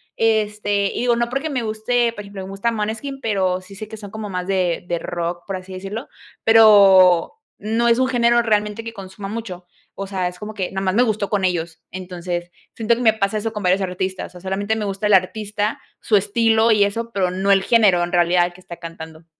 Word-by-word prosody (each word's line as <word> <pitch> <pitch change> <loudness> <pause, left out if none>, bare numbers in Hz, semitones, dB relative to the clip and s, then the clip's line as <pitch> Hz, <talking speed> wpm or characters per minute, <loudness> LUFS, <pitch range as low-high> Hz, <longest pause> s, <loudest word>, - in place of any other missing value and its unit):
este, 210 -2 +1
y - - -3
digo, 240 -1 +2
no 235 0 0
porque 275 +5 -2
me 260 -5 -2
guste, 230 +2 0
por 210 - -7
ejemplo, 200 -1 -8
me 190 - -8
gusta 195 +4 -1
Måneskin, 225 +5 -4
pero 190 -6 0
sí 190 +2 -14
sé 215 +2 -7
que 220 - -9
son 205 -2 -10
como 215 -1 -6
más 180 -1 -3
de 180 -3 0
de 175 -1 -1
rock, 175 0 -4
por 195 - -3
así 185 0 -9
decirlo, 195 +6 -6 0.4
pero 200 -6 +6 0.2
no 225 +3 0
es 235 0 +4
un 260 - +3
género 240 -2 +3
realmente 210 0 0
que 230 0 -7
consuma 195 -1 -8
mucho, 195 -4 -6 0.3
o 195 - -5
sea, 190 -2 -2
es 180 0 -7
como 210 +2 -7
que 190 -4 -4
nomás 190 -1 -1
me 230 - +3
gustó 215 -4 -1
con 200 -2 0
ellos, 170 -3 -2
entonces, 175 -1 -5 0.2
siento 230 +1 +1
que 240 - -5
me 225 -3 +5
pasa 200 0 -1
eso 225 +1 -3
con 210 -2 -6
varios 185 +2 +2
artistas, 185 0 -4
o, 180 - -11
solamente 200 +3 -2
me 215 -1 -3
gusta 200 +1 -2
el 210 - +3
artista, 210 +3 0 0.2
su 215 - +1
estilo 225 +3 +3
y 210 -2 +4
eso, 230 +3 -2
pero 185 -4 0
no 190 +2 0
el 195 -1 +4
género 200 -6 +4
en 175 - -3
realidad 175 0 +3
el 175 - -11
que 185 - -16
está 170 -1 -10
cantando. 160 -1 -10
200 Hz, 225 wpm, -20 LUFS, 185-220 Hz, 0.4 s, pero